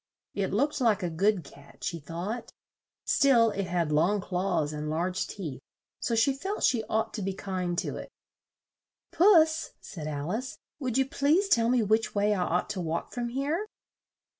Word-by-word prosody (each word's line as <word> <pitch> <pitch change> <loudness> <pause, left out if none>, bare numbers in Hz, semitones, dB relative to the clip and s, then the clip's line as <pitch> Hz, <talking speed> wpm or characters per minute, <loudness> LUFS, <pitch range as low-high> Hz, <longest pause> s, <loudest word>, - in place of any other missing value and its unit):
It 195 -2 -1
looked 280 +8 0
like 215 -5 +3
a 175 - -1
good 190 +2 +2
cat, 140 0 -16
she 170 - -2
thought; 180 +10 -5 0.5
still 235 -5 +4
it 200 -2 -3
had 170 -3 0
long 170 +8 +3
claws 180 -5 -1
and 150 0 -4
large 180 +4 -1
teeth, 155 -10 -6 0.4
so 235 - -1
she 225 +5 +3
felt 385 +10 -4
she 235 -4 +3
ought 220 +1 -1
to 215 - -4
be 195 0 -2
kind 185 -3 -3
to - - -2
it. - - -8 1.0
"Puss," 320 -4 +4
said 155 -5 -7
Al 145 +2 -3
ice, 250 +5 -4 0.2
"would 255 -4 -1
you 265 - +3
please 300 +9 +2
tell 230 -8 +4
me 245 -2 +3
which 220 +2 +1
way 205 +1 +3
I 190 - -1
ought 180 +2 0
to 195 -3 -3
walk 165 -1 -3
from 240 -1 -2
here?" 290 - -1
205 Hz, 180 wpm, -28 LUFS, 175-250 Hz, 1.0 s, still